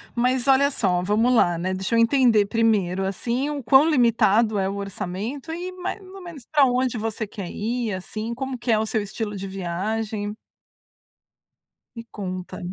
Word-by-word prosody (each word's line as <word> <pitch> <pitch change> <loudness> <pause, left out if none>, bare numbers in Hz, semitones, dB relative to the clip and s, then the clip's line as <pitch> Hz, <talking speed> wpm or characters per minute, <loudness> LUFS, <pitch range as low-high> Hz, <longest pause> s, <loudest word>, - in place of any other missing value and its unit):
Mas 250 +1 +1
olha 275 +1 +5
só, 185 -8 +1
vamos 220 +6 +2
lá, 175 -8 +3
né. 185 +3 -2
Deixa 190 +4 -2
eu - - +4
entender 230 -3 +4
primeiro, 200 -4 +1
assim, 235 +8 -2
o 290 -2 -4
quão 265 +7 +5
limitado 230 -5 +3
é 190 -1 0
o 195 - -4
orçamento 200 - -5
e 350 +3 -5
mais 370 +3 -5
ou 385 0 -12
menos 335 -8 -10
pra 295 -3 +5
onde 250 -1 0
você 220 0 -3
quer 195 -3 -7
ir, 230 0 -2
assim, 215 +5 -5
como 260 +1 -4
que 240 0 -2
é 220 - +4
o 220 - 0
seu 220 0 -1
estilo 205 +1 -5
de 195 0 -5
viagem. 205 +3 -3 1.6
Me 230 - -7
conta. 185 -3 -6
225 Hz, 175 wpm, -23 LUFS, 200-255 Hz, 1.6 s, olha